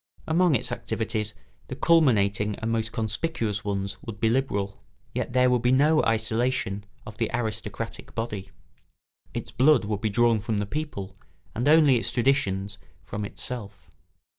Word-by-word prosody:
Among 170 -1 +3
its 110 - -1
activities 110 -1 -2 0.3
the - - -5
culminating 105 - +3
and 115 +1 -3
most 115 0 0
conspicuous 110 -1 -2
ones 100 -1 -2
would 110 -3 -8
be 110 0 +3
liberal. 100 -6 -1 0.3
Yet - - -3
there 125 0 +5
would 125 -2 +2
be 125 +1 +3
no 150 +4 +5
isolation 115 -2 0 0.2
of 110 -1 -10
the 115 - +1
aristocratic 110 -2 -4
body; 105 -4 -4 0.9
its - - -4
blood 130 -3 +4
would 105 -1 -2
be 110 - +1
drawn 115 +1 +3
from 110 +1 -2
the 105 - 0
people, 100 -8 -5 0.4
and 120 +5 -1
only 150 -4 +6
its - - -2
traditions 105 -6 +1 0.2
from 105 +5 -5
itself. 105 0 -6
110 Hz, 150 wpm, -26 LUFS, 105-125 Hz, 0.9 s, only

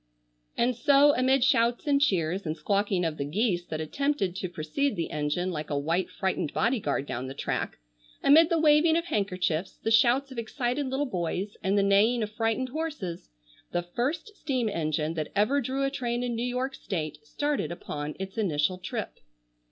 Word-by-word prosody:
And 245 +1 +2
so, 285 +4 +5
amid 260 0 +3
shouts 240 -1 +2
and 280 -1 +3
cheers, 185 - +1
and 155 0 -3
squawking 195 +2 0
of 160 -1 -2
the - - -2
geese 175 - 0
that 155 - -4
attempted 195 - -1
to 185 -2 -3
precede 175 - -1
the 170 - -3
engine 150 +5 -1
like 155 -2 -5
a 145 - -1
white 165 +6 0
frightened 190 -6 -2
body 235 +2 +1
guard 145 -6 -1
down 125 -1 -4
the 135 - -7
track; - - -3 0.5
amid 315 +4 +7
the 335 - +2
waving 315 +1 +5
of 335 - -1
handkerchiefs, 185 - -1
the 225 - -2
shouts 245 +4 +4
of 250 - -5
excited 250 +3 -2
little 265 +2 -1
boys, 190 - -3
and 195 +2 +1
the 200 - +4
neighing 215 +4 +4
of 210 - -4
frightened 225 +3 -1
horses, 285 - -4 0.4
the 175 0 0
first 285 - -3
steam 260 - -1
engine 155 -4 -1
that 155 -2 -4
ever 215 +8 +3
drew 265 +2 -2
a 275 - +1
train 245 -3 -2
in 245 -1 -1
New 230 - -2
York 255 +2 -2
state 160 - -4
started 290 - -2
upon 150 -3 -5
its 195 +3 -5
initial 180 -2 +1
trip. 185 - -5
210 Hz, 185 wpm, -28 LUFS, 170-265 Hz, 0.5 s, amid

